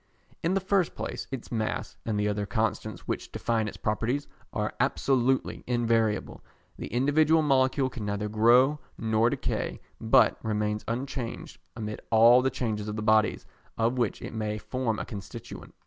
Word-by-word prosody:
In 170 Hz, +3 st, +1 dB
the -, -, +3 dB
first 190 Hz, -2 st, +1 dB
place -, -, -5 dB
its 135 Hz, -3 st, -7 dB
mass, 110 Hz, -2 st, -2 dB
and 105 Hz, -2 st, 0 dB
the 105 Hz, -, +1 dB
other 105 Hz, 0 st, -1 dB
constants 110 Hz, -1 st, -2 dB
which -, -, -3 dB
define 115 Hz, -2 st, 0 dB
its -, -, -7 dB
properties, 120 Hz, +6 st, -1 dB, 0.3 s
are -, -, -2 dB
absolutely 130 Hz, -1 st, +1 dB
invariable; 115 Hz, -3 st, 0 dB, 0.3 s
the -, -, -6 dB
individual 150 Hz, +6 st, +3 dB
molecule 130 Hz, -1 st, +3 dB
can 120 Hz, -4 st, -6 dB
neither 100 Hz, +1 st, -2 dB
grow 120 Hz, +7 st, +4 dB, 0.2 s
nor 110 Hz, +1 st, +2 dB
decay, -, -, -2 dB, 0.2 s
but 120 Hz, +3 st, +4 dB
remains 105 Hz, -1 st, -1 dB
unchanged 125 Hz, 0 st, -4 dB, 0.2 s
amid 105 Hz, -2 st, -5 dB
all 115 Hz, +3 st, +7 dB
the 130 Hz, -, +2 dB
changes 110 Hz, -5 st, -3 dB
of 105 Hz, -, -3 dB
the 105 Hz, -, -3 dB
bodies 110 Hz, 0 st, +3 dB, 0.3 s
of 115 Hz, +3 st, +1 dB
which 120 Hz, -4 st, -1 dB
it -, -, -6 dB
may 105 Hz, -1 st, -2 dB
form 115 Hz, 0 st, -2 dB
a -, -, -4 dB
constituent. 105 Hz, +1 st, -9 dB
115 Hz, 160 wpm, -28 LUFS, 110-130 Hz, 0.3 s, all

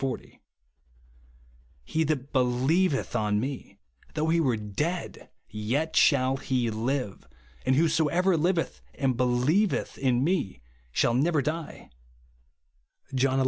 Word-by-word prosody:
40). 135 Hz, -2 st, -5 dB, 0.7 s
* -, -, -31 dB
He 160 Hz, -, 0 dB
that 140 Hz, -2 st, -2 dB
helieveth 135 Hz, +5 st, +1 dB
on 105 Hz, -3 st, +1 dB
me, 130 Hz, -5 st, -5 dB, 0.4 s
though 155 Hz, +1 st, 0 dB
he 170 Hz, +1 st, +3 dB
were 130 Hz, -8 st, +2 dB
dead, 150 Hz, -, -4 dB, 0.2 s
yet 125 Hz, +10 st, -2 dB
shall 135 Hz, -2 st, +4 dB
he 125 Hz, -4 st, -1 dB
live; 115 Hz, -1 st, -3 dB, 0.4 s
and 130 Hz, -, +4 dB
whosoever 165 Hz, +4 st, +2 dB
liv 175 Hz, +3 st, +2 dB
eth 165 Hz, -, -3 dB
and 135 Hz, -3 st, 0 dB
helieveth 125 Hz, -, +1 dB
in 130 Hz, -2 st, +2 dB
me 145 Hz, -, -1 dB, 0.3 s
shall 115 Hz, -, +2 dB
never 145 Hz, +3 st, +2 dB
die," 155 Hz, +3 st, -5 dB, 1.2 s
(John 130 Hz, 0 st, +2 dB
xi. -, -, +3 dB
135 Hz, 125 wpm, -27 LUFS, 115-155 Hz, 1.2 s, shall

